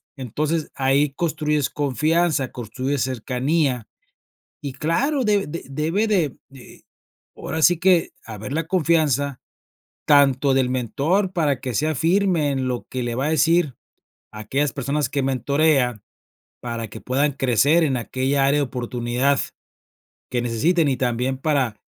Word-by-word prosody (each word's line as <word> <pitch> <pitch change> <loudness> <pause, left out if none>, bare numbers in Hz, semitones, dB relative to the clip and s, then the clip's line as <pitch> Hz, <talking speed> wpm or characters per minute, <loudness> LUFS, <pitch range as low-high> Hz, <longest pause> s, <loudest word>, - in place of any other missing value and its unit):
Entonces, 150 +5 -2
ahí 135 +2 +2
construyes 150 -4 -1
confianza, 150 0 0
construyes 130 +3 -3
cercanía, 130 +1 -1 0.8
y 140 - -4
claro, 240 - 0
de 205 -2 +2
de 165 +3 -6
debe 160 +10 0
de 175 -10 +1
de 135 -2 -15 0.5
ahora 160 - -4
sí 175 0 +5
que, 180 -2 +3
haber 110 +2 -7
la 165 0 -1
confianza 150 -6 +1 0.7
tanto 140 -1 +4
del 130 -1 +2
mentor 145 - 0
para 150 -7 0
que 130 - -4
sea 155 +6 0
firme 170 0 +2
en 135 -2 -1
lo 125 -1 -3
que 130 - -3
le 120 -1 -3
va 130 +3 -1
a - - 0
decir, 160 -2 +2 0.6
a 105 - -8
aquellas 135 +6 -1
personas 140 +2 -1
que 140 -1 -1
mentorea, 135 -3 +1 0.6
para 115 -1 -4
que - - -10
puedan 140 +3 0
crecer 135 +5 +3
en 140 -5 +1
aquella 130 +3 0
área 140 +2 +3
de 140 - 0
oportunidad, 125 +2 -1 0.9
que 120 -1 -1
necesiten, 150 +8 +1
y 135 - +1
también 125 +1 -1
para, 135 -6 0
140 Hz, 140 wpm, -22 LUFS, 130-155 Hz, 0.9 s, sí